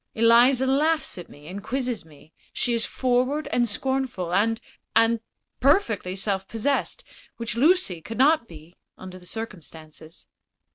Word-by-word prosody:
Eliza 235 +3 +5
laughs 300 - +1
at 175 - -10
me 145 +1 -15
and 195 +4 -7
quizzes 245 0 -3
me; 155 0 -19 0.2
she 245 - -1
is 230 -1 0
forward 255 +4 0
and 240 -1 +2
scornful, 255 -8 -2
and 225 +4 +2 0.4
and 225 +1 +4 0.4
perfectly 230 - +2
self 195 -1 -2
possessed, 275 - -1 0.3
which 230 -1 -3
Lucy 270 - +2
could 225 +7 -7
not 280 -1 +4
be, 160 +2 -14 0.2
under 185 0 -10
the 180 - -15
circumstances." 165 -7 -9
230 Hz, 140 wpm, -25 LUFS, 185-260 Hz, 0.4 s, Eliza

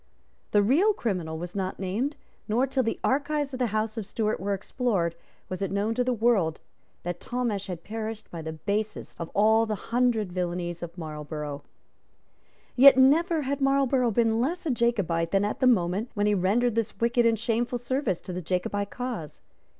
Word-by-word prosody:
The 205 -1 +4
real 330 - +4
criminal 180 - -2
was 175 +2 -6
not 190 -2 -3
named; 215 +10 -2 0.3
nor, 235 +4 +2
till 270 0 0
the 225 -2 -2
archives 285 +1 0
of 255 - -4
the 250 - +2
House 215 +1 -1
of 210 - -5
Stuart 215 0 -1
were 200 +1 -1
explored, 195 -4 -1 0.3
was 185 +1 -5
it 195 - 0
known 205 +3 0
to 250 +2 +1
the 255 - 0
world 220 -9 +2 0.4
that 175 0 -4
Talmash 235 -6 -2
had 175 -3 -6
perished 220 0 -6
by 170 - -6
the 160 0 -5
basest 205 +6 -3
of 165 - -4
all 220 +2 +4
the 215 - -1 0.2
hundred 235 -6 +2
villanies 175 -1 -3
of 170 +1 -7
Marlborough. 150 -2 -5 1.1
Yet 270 +1 +9
never 310 +5 +4
had 280 +1 -2
Marlborough 270 -2 +3
been 225 0 +2
less 335 +8 -2
a 305 - +1
Jacobite 200 -9 +1
than 195 +2 +2
at 210 - -3
the 260 - +4
moment 200 0 +2
when 205 0 +1
he 210 - +3
rendered 210 +6 +2
this 225 -3 -2
wicked 235 0 +3
and 225 -1 +2
shameful 235 +2 -1
service 245 - -1
to 180 - -7
the 180 - -3
Jacobite 185 +4 -2
cause. 245 -12 -5
215 Hz, 185 wpm, -27 LUFS, 185-245 Hz, 1.1 s, Yet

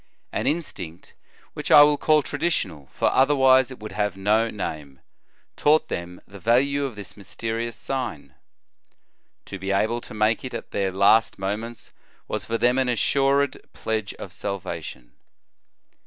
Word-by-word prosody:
An - - -2
instinct, 95 - -4 0.4
which - - -5
I 145 - +10
will 150 0 +4
call 155 +1 +3
traditional, 130 - -2
for - - +1
otherwise 130 -2 +4
it 130 - -9
would 110 0 -8
have 105 -2 -2
no 110 +4 +2
name, 75 -10 -6 0.6
taught 155 +1 +3
them 85 +1 -5
the 100 +2 -13
value 140 +7 +2
of 130 -5 -5
this 100 -2 -9
mysterious 115 +3 -4
sign. 80 - -4 1.1
To 95 - -7
be 95 +1 -5
able 110 +4 +1
to - - -11
make 110 +1 +1
it 130 - -6
at - - -7
their 95 -1 -1
last 100 +4 +4
moments 105 +5 -5 0.4
was - - -3
for 115 - -1
them 125 +3 +2
an 130 -1 +1
assured 140 +4 +2
pledge 110 -2 -3
of - - -9
salvation. 95 -10 -6
110 Hz, 150 wpm, -24 LUFS, 100-130 Hz, 1.1 s, I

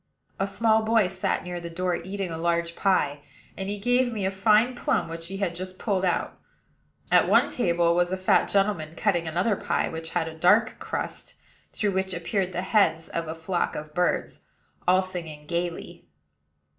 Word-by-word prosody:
A 195 - +1
small 220 +2 +2
boy 220 -1 +3
sat 185 +1 -1
near 180 -1 -5
the 170 0 -7
door, 180 +1 -1
eating 190 0 -4
a 160 - -4
large 170 0 0
pie; 150 -7 +1 0.4
and 195 0 -4
he 205 - -3
gave 245 +4 +2
me 210 -4 -2
a 190 - +1
fine 215 +5 +3
plum 270 +3 0
which 165 0 -6
he 195 +2 -5
had 195 -3 -1
just 185 +1 -6
pulled 195 -3 -1
out. 180 -2 -1 0.7
At - - +5
one - - +5
table 170 -6 +2
was 175 +1 +1
a 190 - -1
fat 185 - +3
gentleman 195 -6 0
cutting 175 -6 0
another 180 +7 +1
pie, - - -1
which 160 0 -5
had 160 - -1
a 160 - -6
dark 205 +8 +3
crust, - - -5 0.4
through 205 -2 -1
which 190 0 -1
appeared 185 +2 -1
the 180 0 -3
heads 165 -6 +2
of 165 -1 -3
a 160 - -4
flock 170 +2 -2
of 150 0 -7
birds, 180 +2 0 0.5
all 185 +1 +5
singing 165 -5 -6
gayly. 170 +1 -4
185 Hz, 185 wpm, -26 LUFS, 170-200 Hz, 0.7 s, At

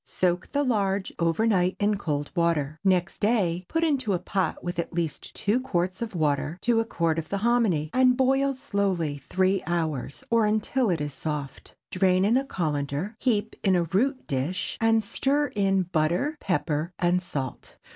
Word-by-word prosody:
Soak 180 -1 -1
the 285 0 +1
large 200 -6 0
over 170 +6 +1
night 185 -4 +2
in 210 0 +2
cold 145 -7 -3
water. 155 -4 0
Next 185 -2 +1
day 190 -5 +1
put 325 0 0
it - - +4
into 260 -8 0
a - - +2
pot 185 +2 -2
with 175 -1 -3
at 170 - -3
least 165 -3 -3
two 215 +4 +1
quarts 185 -7 -2
of 225 -4 -4
water 145 0 0
to 235 -1 +3
a 225 - +1
quart 165 -6 0
of 160 - -7
the 200 - -1
hominy, 205 -11 +2
and 255 -1 +4
boil 270 +1 +2
slowly 185 - -1
three 190 +1 +2
hours, 160 -6 -2
or 230 -2 +4
until 220 +3 +1
it 170 -4 0
is 145 -1 -3
soft. 145 -3 -5 0.2
Drain 185 0 +3
in 220 +4 +3
a 265 - +3
cullender, 155 - -2
heap 220 -3 0
in 190 -2 +3
a 175 - +2
root 255 - 0
dish, 140 +7 -2
and 225 -1 +3
stir 285 +7 0
in 195 -2 +2
butter, 175 - 0
pepper, 165 -3 -1
and 175 +1 +2
salt. 140 -7 -6
185 Hz, 180 wpm, -26 LUFS, 165-225 Hz, 0.2 s, it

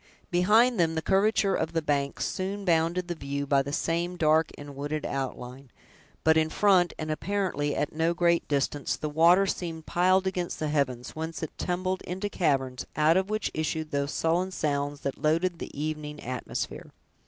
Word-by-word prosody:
Behind 215 +6 +4
them, 165 -1 +2
the 160 - 0
curvature 200 0 +3
of - - -1
the 165 - +1
banks 140 -2 0
soon 195 +2 -3
bounded 170 +1 +1
the 175 - -2
view 140 -2 -4
by 140 -1 +3
the 140 +1 -5
same 170 +4 -1
dark 160 0 +3
and 145 -1 -9
wooded 145 +2 -3
outline; 130 -1 -5 0.5
but 160 0 +5
in 160 0 +2
front, 185 -2 +4
and 155 -1 -3
apparently 165 -4 -1
at 150 - -1
no 165 +2 +1
great 170 -1 +2
distance, 145 0 0
the 150 - -3
water 170 +5 +5
seemed 165 -4 -4
piled 185 +2 +3
against 180 -2 -2
the 155 - -2
heavens, 130 -5 -1
whence 160 +1 -5
it 160 - -5
tumbled 185 +1 -2
into 190 +3 -4
caverns, 135 -9 0
out 155 +2 +4
of 190 +1 +1
which 215 0 -1
issued 155 0 -2
those 140 0 -1
sullen 170 +3 +1
sounds 145 -4 -2
that 140 - -2
had - - -19
loaded 165 +3 +1
the - - -5
evening 150 -1 -4
atmosphere. 125 0 -5
160 Hz, 180 wpm, -28 LUFS, 145-180 Hz, 0.5 s, but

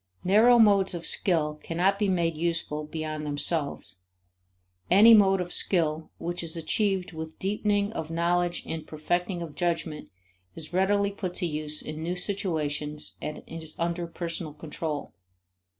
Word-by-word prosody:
Narrow 220 +6 +6
modes 200 -4 +5
of 170 -1 -5
skill 150 -5 +1
cannot 185 +4 +1
be 205 -2 +1
made 170 -3 +1
useful 160 -2 -2
beyond 155 0 -4
themselves; 145 - -1 0.9
any 210 +5 +8
mode 195 -3 +6
of 180 -1 -3
skill 160 -4 +1
which 175 +1 -3
is 165 0 -3
achieved 190 +3 0
with 160 0 -7
deepening 205 +1 0
of 160 -5 -4
knowledge 175 +1 0
and 160 -1 -5
perfecting 175 +3 -2
of 160 -3 -8
judgment 165 -1 -2 0.5
is 160 +1 -8
readily 200 +2 +2
put 185 -3 -5
to 180 - -2
use 150 -1 -1
in 155 +1 -6
new 175 +2 -2
situations 150 -6 -2
and 150 0 -5
is 160 -1 -5
under 170 0 -2
personal 165 -2 -5
control. 155 -1 -5
170 Hz, 145 wpm, -27 LUFS, 155-190 Hz, 0.9 s, any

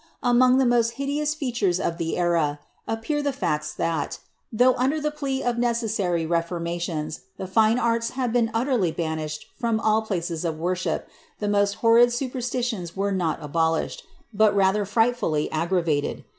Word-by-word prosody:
* - - -31
Among 255 +1 +5
the 265 - +3
most 235 -1 +2
liideous 290 +2 -1
fintures 235 - 0
of 170 -1 -2
the 165 -1 -2
era, 170 -4 +1 0.3
appear 225 +7 -1
the 285 -1 0
facts 150 - -2
that^ 165 -3 -1 0.3
though 250 +3 +4
under 270 +6 0
the 300 0 -1
plea 275 -3 -3
of 240 -1 0
ne 240 - +3
cessary 205 -8 -1
reformations, 170 -2 -2 0.2
the - - -5
fine 220 +4 +3
arts 230 -1 +1
had 250 -3 0
been 235 -2 +2
utterly 230 - +1
banished 155 -2 -4
from 230 -3 +1
all 220 0 +2
places 175 -6 -3
of 165 -2 -2
worship, 180 +3 -2 0.3
the 210 - -3
most 200 0 +2
horrid 235 +1 +7
supersiitions 245 -6 -3
were 200 +1 0
not 175 -6 -1
abolished, 160 +2 -1 0.3
but 210 0 +4
rather 200 +1 +3
frightfully 225 -7 +1
aggravated. 165 -2 0
210 Hz, 160 wpm, -24 LUFS, 170-245 Hz, 0.3 s, horrid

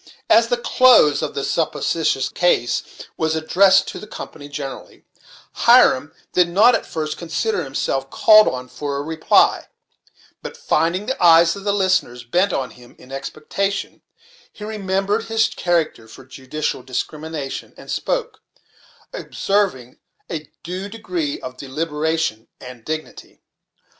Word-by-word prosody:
As - - +6
the - - 0
close 255 - +5
of 155 - -4
this 140 - -2
supposititious 160 -3 0
case 150 -9 +1 0.4
was 160 0 0
addressed 190 +5 +4
to - - -7
the 210 - -10
company 145 -8 -9
generally, 140 -2 -8 0.5
Hiram 145 +4 +4 0.2
did 180 -1 +3
not 215 +8 +5
at - - -1
first 155 -1 -4
consider 180 +3 -2
himself 135 -1 -2
called 215 +6 +6
on 125 0 -3
for 140 +2 -5
a 140 - -3
reply; 160 +1 +2 0.7
but - - -8
finding 175 +5 0
the 260 -5 -3
eyes 165 0 +6
of 200 0 -10
the 205 - +2
listeners 185 -11 0
bent 180 +11 +1
on 130 -5 -2
him 120 -1 -17
in 130 - -16
expectation, 155 +8 -4 0.5
he 210 - -12
remembered 205 0 -1
his 225 0 +2
character 165 -10 -1
for 110 - -14
judicial 135 +2 -4
discrimination, 150 +2 -5
and - - -10
spoke, - - -2 0.7
observing 195 - -2 0.3
a 155 -3 -5
due 185 +4 -5
degree 180 -9 -4
of 130 0 -8
deliberation 150 -3 -2
and 125 -2 -11
dignity. 155 0 -7
160 Hz, 135 wpm, -20 LUFS, 140-195 Hz, 0.7 s, As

